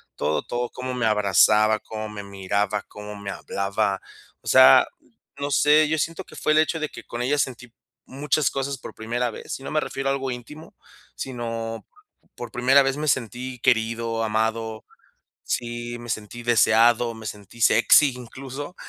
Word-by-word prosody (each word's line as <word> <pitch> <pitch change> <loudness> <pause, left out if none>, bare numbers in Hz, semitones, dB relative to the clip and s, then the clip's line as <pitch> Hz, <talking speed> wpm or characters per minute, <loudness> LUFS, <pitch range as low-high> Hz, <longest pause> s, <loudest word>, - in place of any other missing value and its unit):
Todo, 75 - -1
todo, 120 0 -3
cómo 130 0 -5
me 125 -2 0
abrazaba, 105 +1 +4
cómo 110 0 -6
me 105 -1 -7
miraba, 100 +1 -2
cómo 105 0 -9
me 100 -1 -6
hablaba. 100 0 -2 0.4
O - - -15
sea, 65 - +8 0.5
no 140 0 -2
sé, 150 +2 +4
yo 160 - +1
siento 160 +2 -3
que - - -15
fue - - 0
el 155 - +5
hecho 160 +1 +1
de 155 -1 -2
que - - -11
con 120 +1 -4
ella 145 +4 +1
sentí 125 -3 -3 0.3
muchas 145 +1 0
cosas 135 0 -3
por - - -10
primera 120 +2 -2
vez - - -7
y - - -13
no - - -6
me 155 - +2
refiero 135 -2 -3
a - - +2
algo 135 -1 -2
íntimo. 130 +6 -9 0.4
Sino 115 -3 -5 0.5
por 120 -2 -8
primera 130 +5 +4
vez 135 +1 -1
me 155 +1 -3
sentí 125 0 -2
querido, 115 -1 +1
amado, 110 0 -1 0.6
sí, 120 0 -4
me 120 - -10
sentí 110 +2 -5
deseado, 115 0 +4
me 110 -1 -11
sentí 105 +3 -9
sexy 130 +5 +5
incluso, 135 +6 -8
120 Hz, 170 wpm, -24 LUFS, 110-135 Hz, 0.6 s, sea